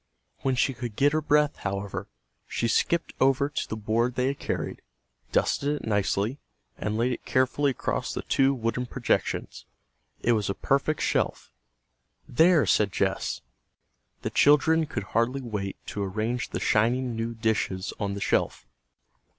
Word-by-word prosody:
When 130 -1 0
she 135 +2 +2
could 120 -3 -6
get 145 +4 +4
her 155 - +2
breath, 150 0 +2
however, 100 0 -4 0.4
she 115 - -1
skipped 170 +8 +1
over 135 +1 +3
to 145 - -3
the - - -2
board 115 +3 0
they 125 +2 +1
had 140 - -4
carried, - - -3 0.5
dusted 145 +1 +1
it - - -7
nicely, 105 +4 0 0.4
and 105 +2 -2
laid 120 +3 +1
it 120 - -4
carefully 130 +3 +2
across 130 - -2
the - - -4
two 135 0 +3
wooden 125 -1 -2
projections. - - -1 0.6
It 120 - +3
was 105 -4 +1
a 100 - -1
perfect 140 +7 0
shelf. - - 0 0.8
"There!" 160 +3 +5
said 105 -2 +3
Jess. 95 0 -1 0.8
The - - -2
children 155 +2 +4
could 115 - -3
hardly 115 +6 0
wait 105 -5 -4
to 105 - -4
arrange 110 +5 -2
the - - -3
shining 120 +3 +2
new 115 +1 -3
dishes 110 -4 -1
on 100 -1 -2
the 100 - -6
shelf. - - 0
120 Hz, 155 wpm, -27 LUFS, 105-140 Hz, 0.8 s, There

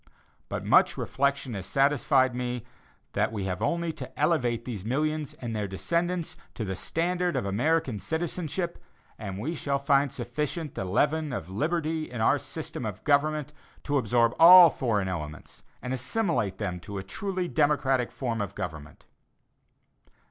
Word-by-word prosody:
But - - -4
much - - +5
reflection 140 -2 0
has 95 -3 -5
satisfied 135 -2 +3
me 125 -1 -3 0.5
that - - +1
we 105 -3 -3
have 90 -2 -3
only 170 -1 0
to - - -9
elevate 125 -7 +1
these 110 -7 -5
millions 150 +5 -1
and 115 -2 -5
their 105 -1 -1
descendants 170 - -1 0.2
to 110 - -3
the 95 -1 -3
standard 175 - -1
of 125 -6 -1
American 125 +3 +1
citizenship, 170 - -3 0.4
and 100 -3 -5
we 135 +11 -3
shall 140 -3 -1
find 140 0 +2
sufficient 150 +5 -3
of - - -29
the - - -4
leaven 150 +10 +1
of 95 -8 -5
liberty 155 - -1
in 120 -1 -6
our 110 - +3
system - - -6
of - - -5
government 150 0 +1 0.3
to 145 -1 +1
absorb 115 0 +2
all 175 0 +10
foreign 105 -8 0
elements 80 -4 -6 0.2
and 125 - -2
assimilate 130 - -1
them 90 -5 -3
to 100 +3 -7
a 95 - -4
truly 185 - -3
democratic 140 -5 +2
form 115 -4 -2
of 100 - -4
government. 80 -6 -7
135 Hz, 155 wpm, -27 LUFS, 110-155 Hz, 0.5 s, all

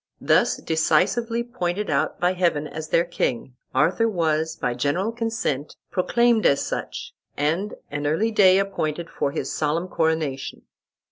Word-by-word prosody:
Thus - - +3
decisively 195 +9 +1
pointed 210 -4 -3
out 150 +2 0
by 180 +1 +2
Heaven 170 -5 0
as 155 0 -6
their 170 +2 +2
king, 130 -7 -2 0.2
Arthur 175 - +3
was 160 -4 0
by 125 - -1
general 145 - 0
consent 225 - -2 0.2
proclaimed 235 +4 +2
as 140 - +2
such, - - -5 0.2
and 165 +8 0 0.2
an 145 0 -2
early 205 +10 +1
day 190 -3 +6
appointed 170 -4 -2
for - - -1
his - - -4
solemn 160 +3 -1
coronation. 160 -6 -1
170 Hz, 140 wpm, -24 LUFS, 150-200 Hz, 0.2 s, day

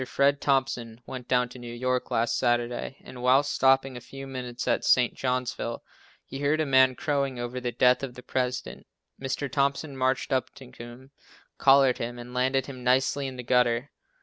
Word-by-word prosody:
Fred 140 +2 +2
Thompson 120 -4 0
went 125 -2 -8
down 125 -1 +2
to 125 - -11
New 120 -1 -8
York 125 +1 -2
last 115 +1 +1
Saturday 120 +2 -1
and 125 - -10
while 130 +3 +4
stopping 135 -1 +2
a 120 - -7
few 135 +2 -9
minutes 125 -2 -6
at - - +1
St. 125 -2 +3
Johnsville, 125 -2 -3 0.4
he 135 - -7
heard 145 +2 +1
a 155 - +1
man 130 -2 +4
crowing 140 -5 -1
over 120 +1 -4
the 125 -1 -2
death 125 +2 +3
of 130 -3 -6
the 125 - -11
President. 125 -1 -3 0.3
Mr. 135 +1 -2
Thompson 140 +2 -1
marched 130 +2 0
up 130 -2 0
to 130 -2 -13
him, 125 +2 -12 0.5
collared 135 -2 +5
him 120 +1 -4
and 120 +1 -9
landed 130 +1 +1
him 130 -3 -9
nicely 130 +2 +2
in 130 - -7
the 125 - -7
gutter. 125 +1 +1
130 Hz, 185 wpm, -27 LUFS, 125-135 Hz, 0.5 s, collared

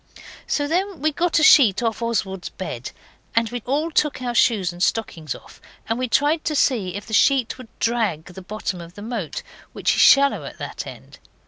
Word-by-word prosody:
So 290 -1 0
then 365 +3 -1
we 310 +3 +1
got 340 +3 0
a 310 - +3
sheet 240 -9 +6
off 225 0 -1
Oswald's 200 -5 -2
bed, 130 -10 -6 0.5
and 230 0 +2
we 245 -1 -4
all 300 +5 0
took 300 -3 +1
our 245 -1 -3
shoes 200 -7 +2
and 175 - -11
stockings 165 - -1
off, - - -15 0.3
and 225 +2 -1
we 255 - -1
tried 295 +6 +2
to 305 - -1
see 210 -11 +1
if 205 - -6
the 220 - -9
sheet 255 +4 +3
would 255 - -10
drag 220 -9 0
the 180 +1 -11
bottom 190 -2 -5
of 170 +1 -12
the 205 - -9
moat, 220 -8 -4 0.3
which - - +1
is - - +3
shallow 280 0 +5
at - - -9
that - - -6
end. - - -12
230 Hz, 205 wpm, -22 LUFS, 190-280 Hz, 0.5 s, sheet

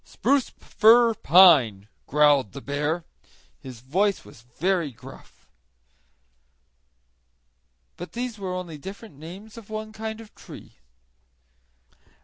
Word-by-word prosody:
"Spruce, 280 -2 0
fir, 230 +1 +3
pine," 140 - +5 0.2
growled 145 -5 +3
the 140 - -7
bear. 150 +5 -3 0.6
His 125 -3 -11
voice 190 +10 -1
was 115 - -16
very 165 +6 -2
gruff. 130 +2 -16 2.5
But 175 - -7
all - - -34
these 235 -4 -6
were 185 -2 -4
only 170 -4 -7
different 195 -1 -11
names 190 +8 -11
of 220 - -17
one 215 0 -6
kind 220 0 -6
of 225 -2 -14
tree. - - -14
180 Hz, 115 wpm, -24 LUFS, 140-215 Hz, 2.5 s, pine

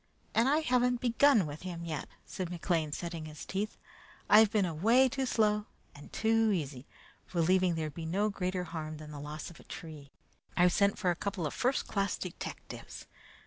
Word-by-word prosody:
"And 230 +4 +4
I 300 +3 +3
haven't 250 -4 +2
begun 240 - +4
with 150 0 -7
him 170 -2 -6
yet," 155 -4 -4 0.2
said 185 -2 -4
McLean, 170 -3 -1
setting 165 0 -4
his 155 -1 -9
teeth. 205 +3 -3 0.5
"I've 215 +1 +8
been 210 -3 +2
away 220 +11 +4
too 265 +1 -2
slow 210 -3 +2 0.3
and 145 - -13
too 225 0 +2
easy, 145 -7 -3 0.4
believing 180 +1 +3
there'd 155 -2 -3
be 160 +2 -6
no 200 +6 +1
greater 185 -2 -2
harm 155 -2 -5
than 150 0 -10
the 145 - -7
loss 150 +3 -6
of 165 - -15
a - - -14
tree. 150 -4 -9 0.5
I've 180 0 +5
sent 200 -1 +3
for 185 -3 +1
a - - -1
couple 185 -2 -3
of 150 - -2
first 255 +2 0
class 200 -2 0
detectives. 180 - -7
180 Hz, 185 wpm, -31 LUFS, 160-215 Hz, 0.5 s, I've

